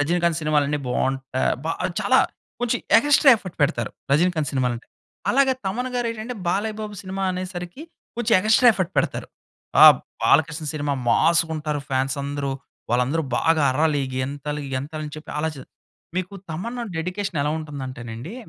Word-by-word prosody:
రజినీకాంత్ 170 +2 +1
సినిమాలు 150 -1 +2
అన్ని 150 0 0
బాగుంటాయి, 130 +1 0
బా 160 - -1 0.3
చాలా - - +4 0.4
కొంచెం 245 0 +1 0.2
ఎగాస్ట్రా 290 +2 +5
ఎఫర్ట్ 185 -5 -10
పెడతారు 120 -5 0 0.2
'రజినీకాంత్' 160 -1 +2
సినిమాలు 125 -3 +1
అంటే. 115 - -13 0.4
అలాగే 270 0 +3
'తమన్' 245 +7 -2
గారు 245 -1 0
ఏంటంటే, 230 +2 -6
'బాలయ్య 210 +4 0
బాబు' 210 -2 -6
సినిమా 190 0 -4
అనేసరికి 180 - -6 0.3
కొంచెం 240 -1 0
ఎగా‌స్ట్రా 220 +5 +5
ఎఫర్ట్ 185 -1 -2
పెడతారు. - - -1 0.5
ఆ - - +12 0.4
'బాలకృష్ణ' 155 0 +2
సినిమా 145 -1 -1 0.2
మాస్‌గా 165 +4 +3
ఉంటారు, 150 -1 -2
ఫ్యాన్స్ 130 +1 0
అందరూ, 140 -1 -3 0.4
వాళ్ళందరూ 125 +7 +1 0.2
బాగా 160 -2 +3
అర్రాలి, 145 +1 +1
గెంతాలి 145 +3 -3
గెంతాలి 150 +4 -4
అని 150 - -8
చెప్పి 155 - -9
ఆలచే 150 -3 -3 0.5
మీకు 185 +2 -3 0.2
తమన్ 230 +10 -4 0.2
డెడికేషన్ 180 +1 -3
ఎలా 145 +1 0
ఉంటుంది 150 -3 -7
అంటేనండి, 120 - -7
160 Hz, 150 wpm, -23 LUFS, 145-195 Hz, 0.5 s, ఆ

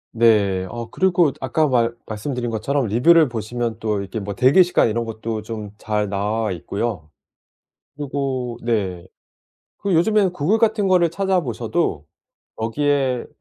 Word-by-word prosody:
네. 100 -5 +3
어 120 -1 -7
그리고 175 -5 +3
아까 150 +4 +1
말 120 -3 +2
말씀드린 120 +2 -4
것처럼 130 +4 -1
리뷰를 145 +8 +4
보시면 115 0 -4
또 105 -3 -1
이렇게 100 +3 -5
뭐 100 -1 -5
대기 135 - +6
시간 175 -8 +2
이런 115 +1 -1
것도 110 0 -4
좀 105 -2 -7
잘 105 -1 -1
나와 105 +2 -1
있고요. 90 -2 -4 0.9
그리고 135 -4 -3
네. 95 -6 -2 0.7
그리고 185 -5 +1
요즘에는 200 0 +2
구글 180 +7 +1
같은 215 -3 +2
거를 175 -3 +3
찾아 190 0 +1
보셔도 115 - -2 0.6
"여기에 135 +1 0
120 Hz, 295 characters per minute, -21 LUFS, 110-150 Hz, 0.9 s, 대기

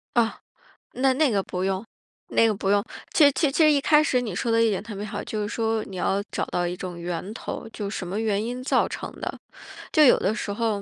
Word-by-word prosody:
啊， 230 -2 +2 0.5
那 265 +1 +2
那 285 0 +2
个 200 -2 +1
不 180 0 -4
用 190 +2 -1 0.4
那 230 - +4
个 220 - +2
不 195 0 -2
用。 200 0 +3 0.3
其 290 -3 +6
其 295 0 +1
其 315 - +3
实 305 - +6
一 290 - +3
开 300 +2 +5
始 255 -4 +1
你 215 -7 -4
说 230 - -1
的 230 0 +4
一 225 - +4
点 195 -3 -1
特 220 -2 -8
别 205 +2 -5
好， 205 -1 -5
就 215 - -3
是 205 - -2
说 225 -1 -1
你 195 - -9
要 195 +2 +1
找 - - -1
到 175 - -1
一 175 - -3
种 180 -1 -6
源 175 +3 -4
头， 225 - -6
就 205 -2 -4
什 195 -3 -5
么 195 +4 -3
原 215 -2 0
因 245 +2 -4
造 - - +2
成 - - -6
的？ - - -4 0.5
就 310 - +5
有 265 - +7
的 195 - +1
时 205 - -3
候 215 -2 -1
215 Hz, 270 characters per minute, -25 LUFS, 195-245 Hz, 0.5 s, 有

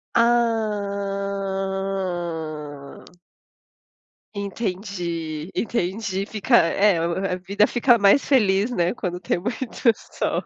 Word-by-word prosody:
Ah! 195 -8 -1 1.3
Entendi, 180 -6 -4
entendi, 195 -2 -1
fica 220 +3 +1
é 195 +2 +3
a 180 +3 -1
vida 200 +3 +2
fica 240 +1 +3
mais 200 +6 +5
feliz, 210 -5 +3
né? 175 -5 +1
Quando 180 -7 -4
tem 180 - -1
muito 240 +4 -1
sol. - - -3
195 Hz, 85 wpm, -23 LUFS, 175-215 Hz, 1.3 s, mais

